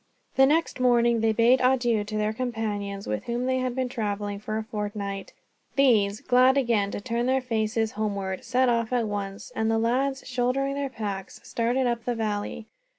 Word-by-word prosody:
The 270 0 +6
next 320 -1 +1
morning 240 -2 +3
they 225 0 +3
bade 235 +4 +4
adieu 245 -4 +2
to 215 +1 -4
their 215 0 0
companions, 210 -4 -3
with 105 - -3
whom 240 +1 -2
they 260 0 +1
had 255 -1 -2
been 260 -1 0
traveling 205 -4 -3
for 215 +1 -3
a 220 - -2
fortnight. 205 -2 -4 0.4
These, 215 -7 +3
glad 255 +2 +4
again 230 -7 +2
to - - -4
turn 235 +2 -2
their 260 +1 +3
faces 225 -2 -1
homeward, 200 -3 -3
set 255 +2 +2
off 230 -1 +1
at 245 -2 +1
once; 200 +1 -5
and 220 0 0
the 225 - +2
lads, 265 +4 0
shouldering 255 +2 0
their 280 -1 -2
packs, 200 -6 -5
started 240 +3 0
up 235 -2 -1
the 245 - -1
valley. 215 0 -3
230 Hz, 185 wpm, -26 LUFS, 210-255 Hz, 0.4 s, The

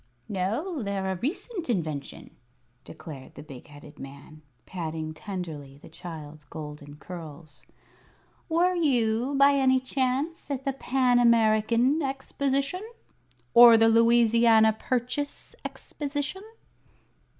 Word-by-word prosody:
"No, 230 - -2
they're 195 -2 -2
a - - -2
recent 335 - -4
invention," 155 -10 -4 0.5
declared 140 -5 -11
the - - -10
big 140 -5 -12
headed 145 +1 -14
man, 140 +3 -11 0.2
patting 160 -3 -5
tenderly 155 -8 -7
the - - -15
child's 155 -3 -9
golden 150 -1 -9
curls. 155 -2 -11 0.8
"Were 345 +3 +2
you, 255 -5 +1
by 275 +1 +6
any 260 -2 +3
chance, 265 +5 -2
at 270 -2 -4
the 275 - 0
Pan 255 -2 +2
American 235 +4 +3
Exposition? 275 +3 -2 0.7
Or 235 -1 +9
the 225 0 +5
Louisiana 230 -1 +5
Purchase 250 +5 -3
Exposition?" 290 +5 -5
230 Hz, 105 wpm, -27 LUFS, -, 0.8 s, Or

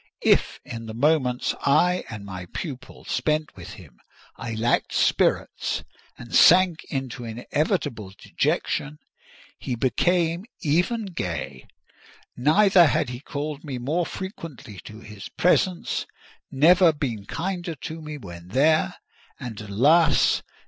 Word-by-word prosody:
If, - - +3
in 115 -1 -7
the 110 - -7
moments 130 -2 +1
I 180 +6 +3
and 105 -2 -7
my 95 -2 -7
pupil 135 - -8
spent 150 +4 -1
with 90 -2 -10
him, 70 -10 -15 0.4
I 115 -1 -5
lacked 115 +2 0
spirits - - +1 0.3
and 120 -1 -11
sank 180 -2 +6
into 135 -3 -5
inevitable 120 - -2
dejection, 75 +1 -2 0.6
he 125 - -3
became 170 - +1 0.2
even 180 +9 +1
gay. 80 - -5 0.7
Never 175 +6 +5
had 125 - 0
he 120 -1 -6
called 145 +1 -5
me 140 -5 -5
more 155 +8 -1
frequently 165 - -8
to 110 +1 -10
his 105 -3 -10
presence; 180 0 +1 0.4
never 170 +5 +5
been 120 -9 -4
kinder 175 -1 -3
to 160 +3 -7
me 150 -1 -7
when 85 -8 -10
there—and, 130 - -1
alas! 145 +10 +3
140 Hz, 120 wpm, -24 LUFS, 110-165 Hz, 0.7 s, sank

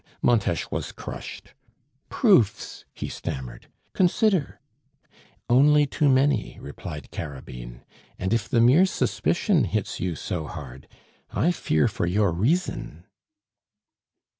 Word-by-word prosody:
Montes - - +1
was - - -3
crushed. - - -9 0.6
"Proofs," 160 - +2
he - - -6
stammered, 65 -2 -6 0.3
"consider 190 - +1 0.4
" - - -30
"Only 145 +4 +5
too 145 +1 +1
many," 135 -2 +2
replied 75 +2 -8
Carabine; 65 -5 -8 0.3
"and 95 +3 -1
if 115 -3 -1
the 120 -3 +3
mere 140 +11 +6
suspicion 180 -1 +1
hits 105 -2 -2
you 90 -1 -2
so 80 +1 -4
hard, 70 -3 -9 0.4
I 170 - +1
fear 80 - +1
for 85 - -2
your 100 +1 +2
reason." 130 - -1
110 Hz, 115 wpm, -25 LUFS, -, 0.6 s, mere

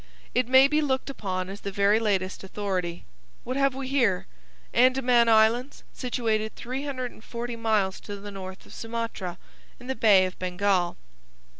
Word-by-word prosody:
It 250 -1 +2
may 260 +2 +7
be 300 +2 +2
looked 270 -1 -1
upon 185 -7 -3
as 195 +1 -8
the 200 - -4
very 200 +2 +3
latest 195 -4 -1
authority. 185 -3 -3 0.4
What 255 - -3
have 275 -1 +2
we 270 -1 -4
here? 245 -9 +2 0.5
'Andaman 250 -2 +4
Islands, 225 +4 +3
situated 220 -4 -1
340 250 -2 -5
miles 215 -4 0
to 205 - -7
the 205 +1 -8
north 190 -1 -8
of - - -14
Sumatra, 225 -6 -4 0.4
in 245 - -12
the 265 - -1
Bay 205 -7 +5
of 185 - -6
Bengal. 185 -1 0
220 Hz, 150 wpm, -26 LUFS, 195-255 Hz, 0.5 s, may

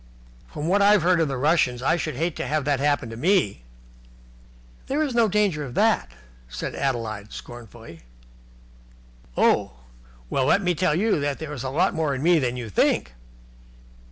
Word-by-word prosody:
"From 150 +1 -5
what 200 +3 +3
I've 205 -2 +5
heard 180 0 +3
of 160 -3 +1
Russians, 130 -2 +1
I 160 - +3
should 155 -4 -3
hate 165 +4 -2
to - - -3
have 150 0 -1
that 145 -2 +1
happen 145 -5 0
to - - -7
me." 155 - +1 1.3
"There 290 +3 0
is 280 -4 -2
no 235 -2 +3
danger 200 -7 +1
of 125 -4 -8
that," - - +2 0.4
said - - -5
Adeline 115 -6 -3
scornfully. 115 -7 -11 1.4
"Oh! - - +2 0.5
Well, 130 - 0
let 200 +8 +3
me 180 0 +2
tell 165 -2 +1
you 205 -1 +1
that 145 -1 -2
there 155 -2 -7
is 135 - -6
a 130 - -3
lot 175 +9 +1
more 155 -4 -1
in 130 - -4
me 170 0 +4
than 125 -3 -2
you 120 -2 -5
think." 85 - +1
150 Hz, 175 wpm, -24 LUFS, 125-175 Hz, 1.4 s, I've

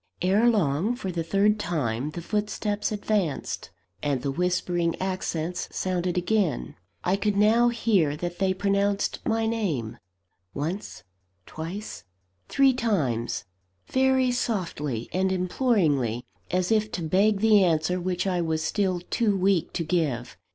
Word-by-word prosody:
Ere 200 +6 +4
long, 195 - +1
for 195 -7 -4
the 170 -1 -2
third 200 +5 +2
time, 145 - -1
the 170 +2 -7
footsteps 210 +1 -1
advanced, 205 -7 -2 0.3
and 140 -4 -1
the 140 - 0
whispering 175 +1 0
accents 180 -2 -2
sounded 180 -1 -1
again. 175 - 0 0.3
I 185 - +2
could 200 +1 0
now 225 +4 +5
hear 200 -11 +1
that 175 +1 -5
they 190 -1 +2
pronounced 200 +1 0
my 225 0 +1
name 185 - -2 0.6
once, 165 - -4 0.4
twice, 175 +7 -6 0.5
three 275 -1 +4
times 150 - -1 0.4
very 260 -1 +2
softly 165 - -2
and 190 +1 +1
imploringly, 175 - +1 0.2
as 180 +1 0
if 215 -1 +2
to 175 - -3
beg 195 +5 +3
the 215 -2 +5
answer 175 +1 +1
which 180 0 -1
I 180 -2 +1
was 160 -1 -1
still 185 0 0
too 215 -5 +2
weak 190 -2 +2
to 170 - -1
give. 155 -8 -1
185 Hz, 135 wpm, -26 LUFS, 160-210 Hz, 0.6 s, now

